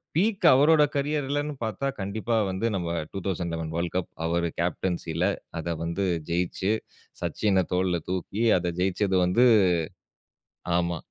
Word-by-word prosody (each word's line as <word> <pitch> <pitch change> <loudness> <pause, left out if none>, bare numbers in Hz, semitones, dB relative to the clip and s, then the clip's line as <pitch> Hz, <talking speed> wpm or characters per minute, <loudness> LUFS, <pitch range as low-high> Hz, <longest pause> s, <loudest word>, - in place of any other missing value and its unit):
Peak 200 +4 +1
அவரோட 150 +4 +6
கேரியர்லன்னு 145 0 -1
பார்த்தா, 110 +5 -2
கண்டிப்பா 110 +4 -2
வந்து 95 +4 -2
நாம் 90 -3 -2 0.2
2011 85 -4 -3
வேர்ல்ட் 85 +1 -2
கப். 90 - -1 0.2
அவரு 85 +1 +1
கேப்டன்சில 85 -1 -1 0.3
அத 85 +1 -2
வந்து 85 +4 -1 0.2
ஜெயிச்சு, 90 +3 0 0.5
சச்சின 95 -3 +1
தோள்ல 90 -1 +1
தூக்கி, 95 +4 -2
அத 90 -1 -1
ஜெயிச்சது 95 +1 +1
வந்து 105 +8 +4 1.3
ஆமா. 85 -1 0
95 Hz, 120 wpm, -26 LUFS, 85-115 Hz, 1.3 s, அவரோட